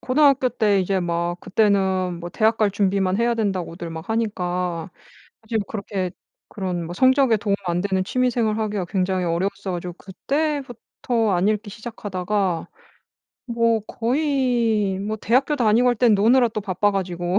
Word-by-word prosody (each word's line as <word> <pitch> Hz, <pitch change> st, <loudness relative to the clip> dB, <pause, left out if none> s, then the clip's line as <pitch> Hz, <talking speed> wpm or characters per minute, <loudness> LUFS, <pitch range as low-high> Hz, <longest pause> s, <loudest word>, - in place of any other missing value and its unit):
고등학교 270 Hz, -1 st, +3 dB
때 210 Hz, -4 st, +2 dB
이제 190 Hz, +1 st, 0 dB
막 170 Hz, 0 st, -2 dB
그때는 190 Hz, -3 st, +1 dB
뭐 175 Hz, +1 st, -6 dB
"대학 220 Hz, +4 st, +2 dB
갈 215 Hz, -2 st, +2 dB
준비만 195 Hz, -1 st, +1 dB
해야 235 Hz, 0 st, +2 dB
된다."고들 185 Hz, -6 st, -3 dB
막 160 Hz, 0 st, -8 dB
하니까 180 Hz, -5 st, -2 dB, 0.5 s
어 -, -, -23 dB
좀 225 Hz, 0 st, 0 dB
그렇게 200 Hz, -3 st, -3 dB, 0.4 s
그런 180 Hz, -4 st, -3 dB
뭐 170 Hz, -, -6 dB
성적에 260 Hz, -1 st, +4 dB
도움 205 Hz, -1 st, 0 dB
안 175 Hz, 0 st, 0 dB
되는 190 Hz, -1 st, 0 dB
취미 255 Hz, +5 st, +1 dB
생활을 225 Hz, -2 st, 0 dB
하기가 210 Hz, -4 st, -2 dB
굉장히 185 Hz, 0 st, -1 dB
어려웠어 190 Hz, +3 st, -2 dB
가지고 175 Hz, 0 st, -5 dB
그때부터 245 Hz, -, -2 dB
안 180 Hz, +3 st, +2 dB
읽기 215 Hz, 0 st, -1 dB
시작하다가 200 Hz, -4 st, -3 dB, 0.8 s
뭐 230 Hz, -2 st, +1 dB
거의 240 Hz, -6 st, 0 dB
뭐 215 Hz, +2 st, -3 dB
대학교 255 Hz, +7 st, +1 dB
다니고 235 Hz, -1 st, +3 dB
할 245 Hz, -, +3 dB
땐 235 Hz, -1 st, +4 dB
노느라 240 Hz, +4 st, +4 dB
또 215 Hz, -1 st, -4 dB
바빠 200 Hz, +1 st, 0 dB
가지고 180 Hz, -1 st, -1 dB
205 Hz, 330 characters per minute, -22 LUFS, 185-230 Hz, 0.8 s, 성적에